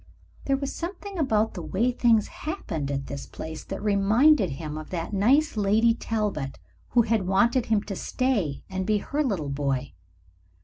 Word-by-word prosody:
There 275 Hz, -1 st, +2 dB
was 275 Hz, 0 st, -4 dB
something 375 Hz, +2 st, -6 dB
about 220 Hz, -7 st, +2 dB
the 180 Hz, -, -6 dB
way 195 Hz, +10 st, 0 dB
things 230 Hz, -3 st, +3 dB
happened 160 Hz, -, -4 dB
at 135 Hz, -1 st, -2 dB
this 140 Hz, -, -6 dB
place 160 Hz, 0 st, -7 dB
that 195 Hz, +1 st, -6 dB
reminded 210 Hz, -, +4 dB
him 150 Hz, +2 st, -5 dB
of 155 Hz, 0 st, -7 dB
that 175 Hz, +3 st, -4 dB
nice 260 Hz, +11 st, +3 dB
Lady 215 Hz, +3 st, +3 dB
Talbot 210 Hz, -, -2 dB, 0.3 s
who 240 Hz, -1 st, +4 dB
had 220 Hz, -4 st, 0 dB
wanted 235 Hz, +6 st, +3 dB
him 215 Hz, -2 st, +2 dB
to 200 Hz, -, -5 dB
stay 210 Hz, -, -1 dB
and 190 Hz, 0 st, -3 dB
be 215 Hz, -1 st, +3 dB
her 290 Hz, +8 st, -1 dB
little 190 Hz, -, -1 dB
boy. 135 Hz, -1 st, -2 dB
210 Hz, 170 wpm, -26 LUFS, 165-245 Hz, 0.3 s, reminded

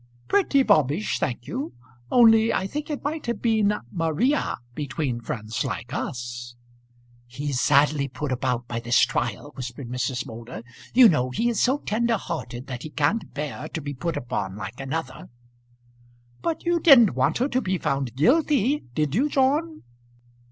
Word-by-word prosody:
"Pretty 335 Hz, -9 st, +3 dB
bobbish, 155 Hz, -, +2 dB
thank 120 Hz, -1 st, -2 dB
you. 265 Hz, +4 st, -4 dB, 0.4 s
Only 225 Hz, -2 st, +6 dB
I 190 Hz, -, 0 dB
think 295 Hz, +10 st, -5 dB
it 295 Hz, -, -4 dB
might 300 Hz, 0 st, -3 dB
have 235 Hz, -, -2 dB
been 220 Hz, -3 st, +2 dB, 0.2 s
Maria 165 Hz, -, 0 dB, 0.2 s
between 135 Hz, -3 st, -3 dB
friends 110 Hz, 0 st, -4 dB
like 120 Hz, +2 st, -5 dB
us." 120 Hz, -1 st, -5 dB, 0.7 s
"He's 135 Hz, +1 st, -3 dB
sadly 145 Hz, 0 st, +3 dB
put 140 Hz, +2 st, -5 dB
about 125 Hz, -1 st, -1 dB
by 115 Hz, -1 st, -3 dB
this 120 Hz, +1 st, +2 dB
trial," 120 Hz, +2 st, -1 dB
whispered 125 Hz, 0 st, -7 dB
Mrs. 125 Hz, 0 st, -2 dB
Moulder. 115 Hz, 0 st, -8 dB, 0.3 s
"You 250 Hz, -1 st, +9 dB
know 130 Hz, -, +2 dB
he 230 Hz, -, 0 dB
is 235 Hz, -, 0 dB
so 260 Hz, +3 st, +3 dB
tender 230 Hz, -2 st, 0 dB
hearted 130 Hz, -9 st, -6 dB
that 125 Hz, -2 st, -6 dB
he 155 Hz, -, -7 dB
can't 150 Hz, +9 st, 0 dB
bear 150 Hz, +1 st, -4 dB
to -, -, -4 dB
be 145 Hz, -1 st, -5 dB
put 165 Hz, +5 st, -3 dB
upon 95 Hz, -5 st, -3 dB
like 105 Hz, +3 st, -7 dB
another." 145 Hz, +5 st, -5 dB, 1.1 s
"But 330 Hz, 0 st, -2 dB
you 345 Hz, 0 st, +2 dB
didn't 265 Hz, -, +7 dB
want -, -, +1 dB
her 255 Hz, -, +1 dB
to 255 Hz, 0 st, 0 dB
be 190 Hz, -4 st, -1 dB
found 135 Hz, -6 st, -2 dB
guilty; 280 Hz, -, +2 dB
did 150 Hz, -2 st, 0 dB
you, 265 Hz, -, +2 dB
John?" 295 Hz, +4 st, +1 dB
150 Hz, 160 wpm, -24 LUFS, -, 1.1 s, You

